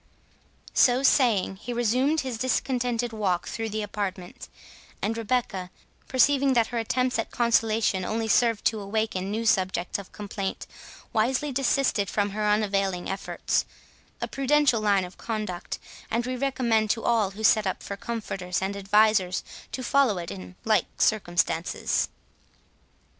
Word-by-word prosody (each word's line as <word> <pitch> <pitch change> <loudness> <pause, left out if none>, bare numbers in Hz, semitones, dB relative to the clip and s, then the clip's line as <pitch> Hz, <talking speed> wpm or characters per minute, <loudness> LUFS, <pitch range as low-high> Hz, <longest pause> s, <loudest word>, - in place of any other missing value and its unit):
So 250 +1 +4
saying, 225 -9 +3
he 240 +5 -6
resumed 255 +7 +2
his 255 -4 -4
discontented 245 -2 0
walk 190 -5 -1
through 225 -1 -3
the 215 0 -2
apartment; 195 -3 -5 0.5
and 220 +2 -1
Rebecca, 225 -5 -1 0.4
perceiving 275 +1 +3
that 230 -2 +2
her 235 - 0
attempts 250 +2 0
at 225 - -2
consolation 225 -4 +2
only 220 +4 -2
served 230 0 +2
to 220 - +2
awaken 200 -2 -2
new 220 +3 -2
subjects 185 -3 +1
of 200 - -11
complaint, 200 -2 -5 0.5
wisely 255 +6 +1
desisted 260 -6 +1
from 205 -1 0
her 210 +1 -1
unavailing 195 -4 0
efforts—a 195 - -4
prudential 275 -3 +2
line 200 -3 +2
of 180 - -13
conduct, 215 -6 -4 0.3
and 235 +2 0
we 255 0 -2
recommend 240 -5 +1
to 225 +2 0
all 225 -4 +2
who 220 - -6
set 215 -2 +4
up 190 - -3
for 200 - -5
comforters 195 -5 -3
and 195 +1 -2
advisers, 200 -1 +3 0.3
to 255 - -4
follow 260 -6 +3
it 170 -1 -5
in 90 -2 -9
the - - -7
like 215 -5 +4
circumstances. 175 -5 +1
220 Hz, 140 wpm, -26 LUFS, 195-240 Hz, 0.5 s, So